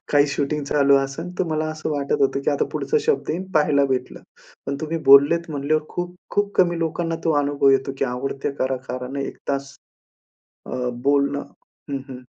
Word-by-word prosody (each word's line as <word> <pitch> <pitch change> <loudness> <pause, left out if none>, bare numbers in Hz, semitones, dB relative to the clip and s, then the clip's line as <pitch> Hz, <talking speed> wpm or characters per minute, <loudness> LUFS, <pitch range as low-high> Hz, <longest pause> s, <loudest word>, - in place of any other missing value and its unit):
काही 145 0 +5
शूटिंग 145 +1 -1
चालू 140 -1 +4
असेल 135 +6 -2
तर - - +2
मला 155 0 0
असं 155 0 -4
वाटत 140 -1 0
होतं 135 0 +2
की - - +2
आता 145 - +1
पुढचा 455 - 0
शब्द 455 - +1
येईन 175 +4 -2
पाहायला 150 -2 +4
भेटलं. 130 -2 -2 0.5
पण 140 +1 -2
तुम्ही 160 +1 -2
बोललेत 160 +5 +6
म्हणल्यावर 150 +1 0
खूप-खूप 180 +3 -3
कमी 175 -2 +3
लोकांना 165 0 -1
तो 165 - +3
अनुभव 140 -1 +2
येतो 135 0 +2
की - - +2
आवडते 135 +3 -3
कलाकाराने 130 +1 -3
1 - - -9
तास, 140 0 -3 0.9
अ, 125 -1 -2
बोलणं 140 0 +2 0.5
हं, 140 - -1
हं. 130 -1 -9
140 Hz, 170 wpm, -22 LUFS, 135-160 Hz, 0.9 s, बोललेत